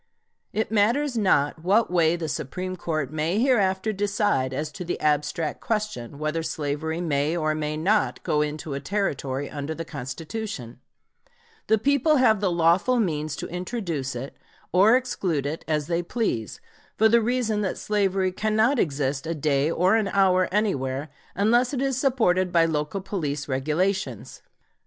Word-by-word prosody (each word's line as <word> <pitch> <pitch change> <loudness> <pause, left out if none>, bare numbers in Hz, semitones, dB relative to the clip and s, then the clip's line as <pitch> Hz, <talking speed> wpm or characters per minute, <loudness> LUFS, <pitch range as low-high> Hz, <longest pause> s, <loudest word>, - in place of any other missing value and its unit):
It 220 +1 -2
matters 240 +6 +2
not 160 -7 +2
what 200 +3 +3
way 170 -2 +3
the 165 -2 -4
Supreme 180 +6 -4
Court 155 -5 -3
may 160 +5 0
hereafter 215 -4 +2
decide 200 -9 0
as 150 +3 -3
to 150 - -7
the 175 - -3
abstract 150 +1 0
question 210 - -3
whether 155 +2 -2
slavery 160 +1 -3
may 155 -1 0
or 155 -2 +1
may 155 0 -2
not 205 +7 +1
go 150 - +1
into 150 0 -3
a 140 - -3
Territory 140 -5 -2
under 145 +2 -5
the 165 - -5
Constitution, 140 - -6 0.9
the 220 - +4
people 280 +6 +3
have 235 -6 +4
the 195 - +2
lawful 175 +9 +3
means 155 -7 -1
to - - -5
introduce 175 - -3
it 130 +3 -6 0.4
or 200 +8 +6
exclude 185 - -2
it, 150 +3 -4
as 150 -2 0
they 170 +2 0
please, 170 - -2 0.4
for 220 - +5
the 235 +1 +4
reason 225 -2 0
that 190 - -2
slavery 195 -3 0
cannot 220 +7 +1
exist 140 -3 -1
a 165 - -2
day 145 -1 +1
or 180 +5 +3
an 220 -3 +1
hour 185 -2 +3
anywhere, 145 -9 -1 0.3
unless 240 +6 +2
it - - -2
is 270 -1 0
supported 220 -9 +2
by 170 -1 +4
local 155 +4 -2
police 150 -8 -3
regulations. 150 - -2
175 Hz, 155 wpm, -25 LUFS, 150-210 Hz, 0.9 s, or